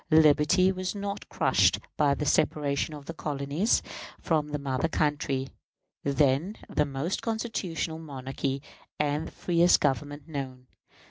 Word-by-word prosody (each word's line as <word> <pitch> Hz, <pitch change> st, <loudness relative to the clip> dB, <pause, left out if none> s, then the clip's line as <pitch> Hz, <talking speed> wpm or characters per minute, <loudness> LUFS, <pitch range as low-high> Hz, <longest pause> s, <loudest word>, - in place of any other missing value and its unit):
Liberty 155 Hz, +4 st, +5 dB
was 185 Hz, +1 st, -3 dB
not 200 Hz, 0 st, -5 dB
crushed -, -, +3 dB, 0.2 s
by 145 Hz, -2 st, +3 dB
the 150 Hz, -, -3 dB
separation 145 Hz, +1 st, +1 dB
of 145 Hz, -1 st, -10 dB
the 165 Hz, -, -6 dB
colonies 150 Hz, +6 st, 0 dB, 0.4 s
from 155 Hz, -3 st, +1 dB
the 150 Hz, 0 st, -3 dB
mother 140 Hz, +1 st, -1 dB
country, 145 Hz, -4 st, 0 dB, 0.5 s
then 140 Hz, +7 st, +2 dB
the 150 Hz, -, +1 dB
most 145 Hz, +6 st, -2 dB
constitutional 190 Hz, -8 st, -2 dB
monarchy 135 Hz, -2 st, -4 dB, 0.4 s
and 150 Hz, +1 st, 0 dB
the -, -, -10 dB
freest 175 Hz, 0 st, +3 dB
Government 145 Hz, +1 st, -1 dB
known. 130 Hz, -4 st, -5 dB
150 Hz, 130 wpm, -28 LUFS, 140-165 Hz, 0.5 s, Liberty